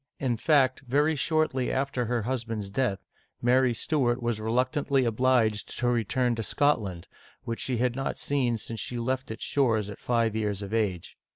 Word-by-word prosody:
In 125 -3 0
fact, 130 +1 +3
very 145 +5 +1
shortly 150 -4 +1
after 135 -2 -1
her 120 -1 -1
husband's 115 -4 -3
death, 125 -5 -1 0.3
Mary 125 +1 +3
Stuart 125 -3 +1
was 120 -3 -2
reluctantly 130 +4 +1
obliged 115 -2 +1
to 125 - 0
return 120 +1 +1
to 115 - -3
Scotland, 105 -8 0 0.4
which 115 0 -4
she 125 -2 -1
had 120 0 +1
not 135 0 -2
seen 130 -5 0
since 110 +1 -6
she 120 - -4
left 130 +2 -2
its 110 - -6
shores 110 -7 +1
at 100 - -10
five 115 -3 +1
years 105 -2 -1
of 100 +2 -7
age. 100 -6 -2
120 Hz, 170 wpm, -27 LUFS, 110-130 Hz, 0.4 s, fact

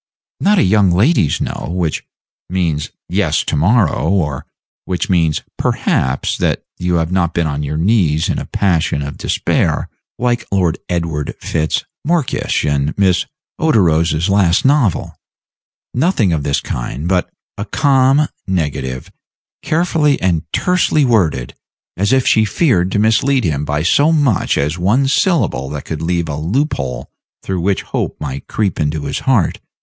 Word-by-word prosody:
Not 205 +1 +3
a - - +4
young 100 0 +3
lady's 95 - +2
No, - - -4
which 85 -3 -2 0.4
means 85 -5 -1 0.2
yes 90 -5 +1
to - - -2
morrow, 90 0 +2
or 75 -9 -1 0.4
which 90 +1 -2
means 80 -4 +1 0.2
perhaps 65 +1 0
that - - 0 0.2
you 90 0 0
have 80 0 0
not 90 -2 0
been 85 - +1
on 75 -1 -2
your 75 +1 -3
knees 85 -4 +2
in - - -1
a - - -7
passion 85 -6 0
of 70 - -6
despair, - - 0 0.3
like 120 -1 0
Lord 90 -4 +1
Edward 85 -4 -2
Fitz 80 -1 -1 0.2
Morkysh 165 - 0
in 70 +1 0
Miss 95 -3 +2 0.3
Oderose's 85 - +2
last 95 -2 +2
novel. 135 - +1 0.7
Nothing 125 - +2
of 80 - 0
this 70 0 0
kind; 65 +5 -4
but 90 -1 +1 0.3
a 105 - -5
calm 135 +4 +3 0.2
negative, 70 -8 -3 0.5
carefully 155 -3 +1
and 85 -3 -1
tersely 180 -5 +2
worded, 85 - +1 0.4
as 100 +3 0
if 130 -1 +3
she 110 - +4
feared 105 - +1
to - - +1
mislead 115 +5 +2
him 75 -4 -1
by 75 +1 -1
so 145 - +3
much 145 - +1
as 75 +5 -1
one 115 +10 +2
syllable 135 - +1
that 75 0 -6
could 80 -1 -5
leave 85 0 -1
a 75 -2 -4
loop 130 - 0
hole 65 -3 -5 0.3
through 95 -2 -2
which 95 +2 0
hope - - -3
might 70 -2 -6
creep 105 -4 -1
into 75 -1 -1
his - - -2
heart. 120 -10 +1
90 Hz, 155 wpm, -16 LUFS, 75-115 Hz, 0.7 s, a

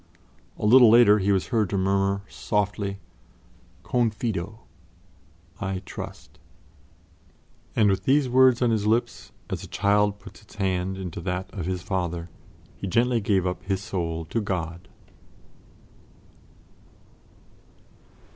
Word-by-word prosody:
A - - -3
little 120 +2 +8
later 110 -2 +6
he 100 +1 +1
was 95 -2 0
heard 110 -6 +1
to 100 - -1
murmur 100 +1 +1
softly, 100 -2 -2 0.9
"Confido" 110 -3 -2 1.0
"I 95 -1 -3
trust"; - - -9 1.4
and 110 - +4
with 95 -1 0
these 140 0 +3
words 130 0 +4
on 120 - +3
his 105 -2 0
lips, 115 +3 -1 0.2
as - - -3
a - - -8
child 105 0 +1
puts 100 +1 -14
its 105 - -18
hand 95 -1 -1
into 90 -3 -6
that 90 +1 -4
of 90 -5 -4
his 90 -2 -3
Father, 90 -3 -3 0.5
he 100 - -5
gently 115 +4 +2
gave 100 -2 +1
up 90 0 -2
his 95 +1 -3
soul 85 -5 -3
to 115 +8 -2
God. 85 -3 -4
100 Hz, 125 wpm, -25 LUFS, 95-110 Hz, 1.4 s, little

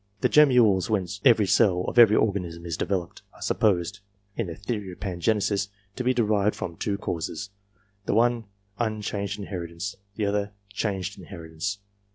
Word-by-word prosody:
The - - +3
gemmules 125 -11 +5
whence 100 -2 -1
every 115 -5 +6
cell 95 -1 +4
of 120 - +2
every 110 -2 +8
organism 90 -6 0
is 85 -2 -2
developed, 90 0 -2
are - - -17
supposed, 100 -1 +1 0.4
in 115 - -2
the 85 - -6
theory 105 -2 -4
of - - -15
Pangenesis, 100 +1 0 0.3
to 125 - -3
be 125 - +3
derived 105 -4 +2
from 85 - -5
two 100 +4 -2
causes: 100 +2 -4 0.6
the - - +1
one, 120 0 +3 0.3
unchanged 105 -2 -2
inheritance; 95 -1 -5 0.2
the 105 - -1
other, 100 0 -1 0.2
changed 100 -2 -2
inheritance. 85 +1 -5
100 Hz, 155 wpm, -26 LUFS, 90-110 Hz, 0.6 s, every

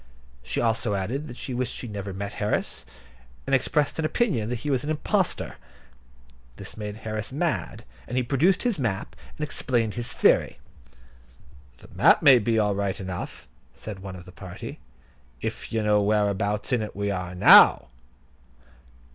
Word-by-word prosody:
She 65 - -3
also 115 -2 +1
added 125 +11 -3
that 120 - -10
she 130 - -5
wished 125 0 -2
she 120 - -6
never 100 -2 -5
had 95 - -7
met 100 +1 -4
Harris, 105 0 -2 0.6
and - - -3
expressed 150 +1 +1
an 160 - 0
opinion 155 - 0
that 120 -1 -3
he 145 - 0
was 130 -2 0
an 150 - -4
impostor. 155 -1 -1 1.0
That - - -9
made 105 -1 -6
Harris 110 0 -4
mad, 145 -6 -2 0.2
and 125 - -3
he 130 - +2
produced 150 +9 +2
his 240 -9 0
map, 110 -6 -2 0.2
and 150 - -4
explained 120 -7 -1
his 120 -1 -3
theory. - - +3 1.2
"The - - -17
map - - +5
may 135 -3 +8
be 115 +1 0
all 105 -2 +2
right 100 -1 -2
enough," 95 -2 -6 0.3
said 105 -3 -8
one 95 -1 -8
of 90 -1 -11
the 90 - -12
party, 90 -1 -9 0.6
"if - - -5
you 115 -1 0
know 105 -1 +3
whereabouts 105 +2 0
in 120 - +2
it 105 - -6
we 100 0 -1
are 90 -1 -4
now." 90 - +7
110 Hz, 170 wpm, -25 LUFS, 100-125 Hz, 1.2 s, may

